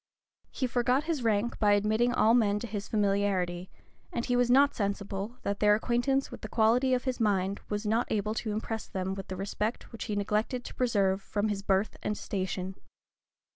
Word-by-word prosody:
He 260 - -2
forgot 250 +3 +1
his 315 -4 -2
rank 225 +1 0
by 205 -2 +4
admitting 215 +4 +2
all 225 -2 +4
men 210 -4 +3
to 210 - -4
his 210 -2 -5
familiarity; 195 -4 0 0.4
and 235 - -2
he 245 - +1
was 245 0 +3
not 280 +3 +5
sensible, 200 +2 -3
that 200 0 -2
their 210 0 +5
acquaintance 245 +5 0
with - - -9
the - - -6
qualities 245 +4 +3
of 250 - -2
his 255 -2 -2
mind 200 -3 +1
was 210 +1 -2
not 225 +3 +1
able 210 0 0
to 220 -1 -3
impress 220 +1 -3
them 190 0 -3
with 195 0 -7
the 190 - -5
respect 205 +4 -3
which 230 - -6
he 210 - -2
neglected 215 +5 -1
to - - -7
preserve 200 -6 +1
from 205 +2 -1
his 200 -1 -2
birth 195 +1 0
and 210 - -2
station. 190 -1 -3
210 Hz, 195 wpm, -29 LUFS, 200-240 Hz, 0.4 s, not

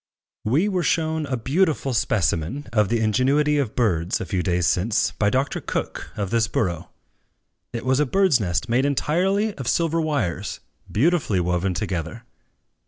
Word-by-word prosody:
We 145 - +2
were 185 -3 0
shown 160 -1 0
a 130 -2 -1
beautiful 140 +1 0
specimen 105 - 0
of 105 -3 +3
the 115 0 +1
ingenuity 140 +7 +2
of 125 -6 -2
birds, 90 -7 +1
a - - -4
few 90 - -1
days 90 -1 0
since, 100 +7 +1
by 105 - +1
Dr. 130 +5 -1
Cook, - - -4
of 100 -3 -3
this 115 -1 +2
borough. 85 -8 -2 0.8
It 115 - -5
was 130 +1 +2
a 150 - +2
birdsnest 125 - +2
made 120 +3 +2
entirely 185 +9 +1
of 130 - -5
silver 165 +1 +1
wires, 120 - -2 0.3
beautifully 140 - +2
woven 90 +1 0
together. 90 +3 -4
120 Hz, 155 wpm, -23 LUFS, 95-150 Hz, 0.8 s, of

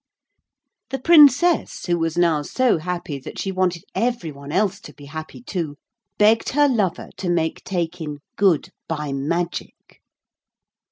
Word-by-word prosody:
The 270 - -2
Princess, 315 +2 +5
who 175 -1 +1
was 165 0 -1
now 165 -4 +3
so 245 - +1
happy 170 -4 -4
that 130 - -9
she 195 - -2
wanted 185 -2 0
every 230 -9 -1
one 140 0 -10
else 200 +2 +1
to 150 - -12
be 145 - -13
happy 155 +10 -8
too, 170 - -4 0.4
begged 215 +2 +4
her 290 +1 +5
lover 210 -9 0
to 185 - -3
make 165 -2 0
Taykin 170 -4 -3 0.2
good 190 -7 +2 0.2
'by 150 -3 -3
magic.' 170 +6 -4
175 Hz, 145 wpm, -22 LUFS, 155-210 Hz, 0.4 s, Princess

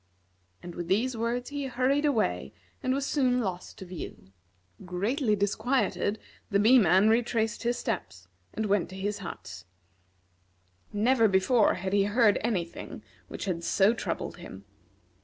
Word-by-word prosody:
And, 175 - -7
with 175 0 -5
these 230 +7 +1
words, 235 +3 -2
he 285 -1 -3
hurried 260 +4 +1
away, 90 - 0 0.3
and 255 - 0
was 275 +1 0
soon 255 -4 +2
lost 185 -6 -4
to 190 - -8
view. 175 - -9 0.5
Greatly 210 - 0
disquieted, 215 +1 0 0.3
the 200 - +2
Bee 230 +6 +6
man 190 +1 +5
retraced 225 -1 +1
his 240 0 0
steps, 90 - -4 0.2
and 220 - -3
went 200 -3 +1
to 185 - -9
his 200 +2 -3
hut. 95 - -8 1.3
Never 230 +2 +3
before 200 +4 +3
had 190 +1 -4
he 200 -1 +4
heard 210 0 +3
any 205 -7 0
thing 170 - -10 0.2
which - - -6
had 175 -3 -2
so 200 +5 +3
troubled 235 - -4
him. - - -11
210 Hz, 150 wpm, -28 LUFS, 190-245 Hz, 1.3 s, Bee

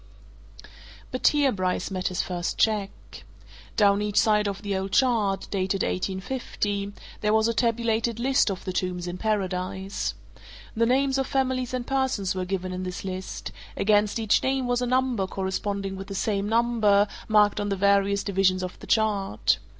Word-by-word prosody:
But 255 - +2
here 290 -3 +4
Bryce 185 -1 -1
met 185 -1 -1
his 185 -1 -1
first 175 -1 -3
check. 210 -3 +2 0.9
Down 200 -1 +4
each 210 0 -2
side 210 -1 +3
of 200 +1 -4
the 200 -1 -1
old 190 0 -3
chart 225 -7 +2
dated 190 0 0
1850 200 +1 -2 0.3
there 210 - +1
was 220 0 +3
a 230 - +1
tabulated 230 0 0
list 265 -1 +3
of 190 -2 -5
the 185 - -3
tombs 180 -1 -2
in 180 0 -5
Paradise. 190 -2 -2 0.6
The 230 +1 +2
names 270 +2 +2
of 265 - -1
families 260 -2 0
and 250 -1 -3
persons 260 -8 0
were 185 -1 -3
given 185 0 -3
in 185 0 -4
this 185 +1 -5
list 185 0 -5 0.3
against 210 0 +2
each 220 -2 +2
name 265 -1 0
was 245 0 0
a 250 - 0
number 255 -6 +1
corresponding 195 +1 -3
with 195 0 -7
the 195 - -6
same 200 0 -1
number, 220 -3 +3 0.2
marked 210 -1 +4
on 205 0 -1
the 200 - 0
various 200 +1 +2
divisions 190 -2 +1
of 185 - -6
the - - -11
chart. 205 - +1
205 Hz, 170 wpm, -26 LUFS, 190-230 Hz, 0.9 s, here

